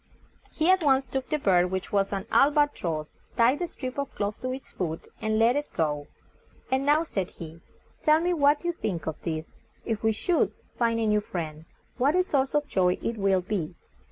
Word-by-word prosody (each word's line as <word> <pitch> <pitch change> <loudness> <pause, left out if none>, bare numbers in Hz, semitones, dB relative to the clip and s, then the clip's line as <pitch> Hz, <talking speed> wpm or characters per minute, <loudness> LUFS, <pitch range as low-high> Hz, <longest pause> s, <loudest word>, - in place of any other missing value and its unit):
He 325 +3 +3
at 375 -1 +4
once 270 -2 +4
took 260 +1 -4
the 305 - +1
bird, 180 -9 +3
which 190 0 -4
was 200 -1 +1
an 195 -1 -3
AL 275 - +6
BA 295 0 +3
TROSS, 155 -3 -4 0.2
tied 240 +5 +4
the 350 - -1
strip 260 -4 -6
of 280 - -2
cloth 205 0 -3
to 255 - -2
its 265 +1 -7
foot, 165 -3 -3 0.2
and 215 0 0
let 230 +3 +4
it 290 +1 -2
go. 150 -3 -1 0.6
"And 265 +2 +1
now," 300 +2 +4
said 195 - -3
he, 165 0 -10 0.4
"tell 305 +1 +5
me 350 +2 +1
what 290 0 +3
you 345 - +2
think 195 - -4
of 160 -1 -4
this. 160 -1 -4 0.3
If 225 -3 -2
we 220 - +3
should, 330 +11 +1 0.2
find 230 -1 +1
a 225 - +1
new 210 -1 +3
friend, 160 -5 -5 0.3
what 275 +6 +3
a 365 - +4
source 275 -5 0
of 295 -1 +1
joy 180 -7 +2
it 230 - -2
will 195 -2 +2
be. 180 -3 -3
230 Hz, 215 wpm, -27 LUFS, 180-285 Hz, 0.6 s, AL